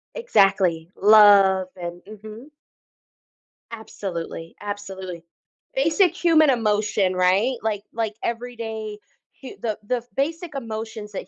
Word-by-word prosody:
Exactly. 195 - +2
Love 200 -3 +6
and 175 -1 -7
mhm. 215 +6 -11 1.2
Absolutely, 175 -7 -7
absolutely, 190 -4 -7 0.5
basic 360 -6 +2
human 320 -4 +4
emotion, 210 -5 +1
right, 190 +8 +2
like 210 -2 -2
like 220 -2 -2
every 240 +1 -4
day 220 -2 -6 0.4
hu 265 - -8
the 220 -3 -2
the 240 +2 -2
basic 320 +2 -2
emotions 220 -3 -6
that 190 - -6
215 Hz, 105 wpm, -23 LUFS, 195-240 Hz, 1.2 s, Love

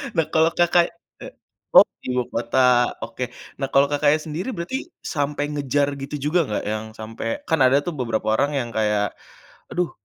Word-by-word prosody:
Nah, 165 - +3
kalau 160 +1 +4
Kakak 175 0 +3 0.3
e - - -7 0.5
oh, - - +10 0.2
ibukota, 125 0 +2
oke. 120 +1 -5 0.3
Nah, 135 - -1
kalau 140 +1 +5
Kakaknya 145 +1 +3
sendiri 160 +9 -5
berarti 170 +9 -3 0.2
sampai 145 -1 -2
ngejar 145 0 0
gitu 140 +2 -5 0.2
juga 180 - +4
nggak 105 - -2
yang 110 0 -3
sampai 110 +1 -6 0.2
kan 160 - +2
ada 130 +2 +5
tuh 175 - -2
beberapa 115 -3 -2
orang 145 +4 +1
yang 120 - -3
kayak, 105 -2 +1 0.6
"Aduh, 175 -2 -1
140 Hz, 160 wpm, -23 LUFS, 120-155 Hz, 0.6 s, oh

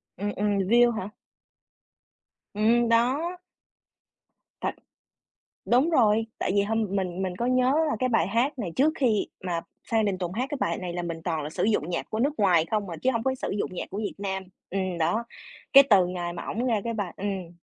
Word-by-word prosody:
Ừm, 205 +3 -2
ừm. 205 0 +1
View 235 +5 +4
hả? 210 -4 -4 1.4
Ừm, 230 +3 +3
đó. 270 +10 +2 1.2
Thật. - - -2 0.9
Đúng 260 +7 +3
rồi, 225 -7 +3
tại - - -1
vì 200 - +4
hôm 225 +1 0
mình 190 -1 -2
mình 185 -1 -2
có 235 - -2
nhớ 255 +1 +3 0.2
là 295 - 0
cái 255 - +1
bài 225 -8 +2
hát 245 +7 0
này 190 -7 -3
trước 305 +4 +3
khi 230 -7 +1 0.2
mà 175 -2 -2 0.3
Phan 225 -1 +3
Đình 195 -2 0
Tùng 180 -1 -4
hát 245 +6 -1
cái 290 - -3
bài 170 -6 0
này 180 -2 -5
là 175 - -2
mình 165 -1 -5
toàn 165 -3 -1
là 150 - -4
sử - - -3
dụng 210 -6 +1
nhạc 170 - -3
của 220 - -3
nước 280 +5 +2
ngoài 175 -6 +4
không 210 -3 -1
à, 170 - -5
chứ 260 - +2
hông 230 -2 -2
có 265 0 0
sử - - -4
dụng 185 - -2
nhạc 180 - -5
của 195 - -6
Việt 210 -1 -3
Nam. 190 -1 -3 0.3
Ừm, 185 -2 -2
đó, 170 +8 +1 0.5
cái 275 0 +10
từ 190 -5 +6
ngày 175 -1 -4
mà 170 - -6
ổng 235 +4 -2
ra 225 -5 +1
cái 235 - -2
bài 205 -5 -3
ừm. 190 -3 -4
205 Hz, 215 wpm, -26 LUFS, 185-235 Hz, 1.4 s, cái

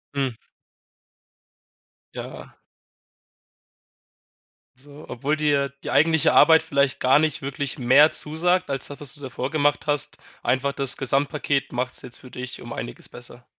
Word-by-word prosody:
Hm. 135 -4 -1 1.8
Ja. - - -9 2.2
So, 145 +3 -13
obwohl 145 +5 -2
dir 145 -2 +1 0.2
die - - -3
eigentliche 160 0 +4
Arbeit 160 -1 +7
vielleicht 140 -4 0
gar 130 +2 +4
nicht 155 -1 0
wirklich 140 0 -4
mehr 135 +5 +6
zusagt 175 +4 0
als 135 -1 -2
das, 145 - -9
was 140 -4 -3
du 145 - -14
davor 130 -1 -4
gemacht 145 0 +1
hast. 145 -1 0 0.3
Einfach 140 +2 0
das 135 -2 +2
Gesamtpaket 140 +1 -1
macht's 125 +1 -3
jetzt 125 -1 -8
für 130 - -13
dich 125 0 -7
um - - -8
Einiges - - -7
besser. 120 0 -10
140 Hz, 135 wpm, -23 LUFS, 130-150 Hz, 2.2 s, Arbeit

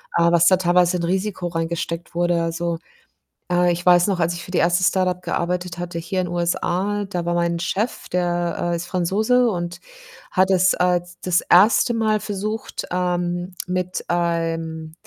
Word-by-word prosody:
äh, 170 0 +4
was 170 0 +4
da 185 +1 +6
teilweise 180 0 +3
in 170 - -4
Risiko 185 +1 -1
reingesteckt 170 0 -4
wurde. 175 0 +1
Also, 170 0 -2 0.7
äh, 175 0 +3
ich 175 +1 -5
weiß 175 +2 +6
noch, 190 -3 0
als 170 +1 +1
ich 170 - -7
für - - -11
die 180 - 0
1. 175 +2 +2
Start-up 185 0 +1
gearbeitet 175 0 -2
hatte 175 -1 -4
hier 175 +3 -2
in 180 - -2
USA, 180 +4 -1
da 175 -4 -3
war 175 - -1
mein 170 0 0
Chef, 200 +7 -3
der, 175 -1 -1
äh, - - 0
ist 170 - -5
Franzose 215 +8 +2
und 175 -3 -4 0.5
hat 185 +1 +3
es, 185 0 +4
äh, 180 0 +2 0.2
das 180 -1 +2
1. 215 +6 +4
Mal 215 -2 +1
versucht, 210 +2 -4
ähm, 180 0 -2
mit 180 0 -3
einem, 165 -2 -2
175 Hz, 170 wpm, -21 LUFS, 170-185 Hz, 0.7 s, da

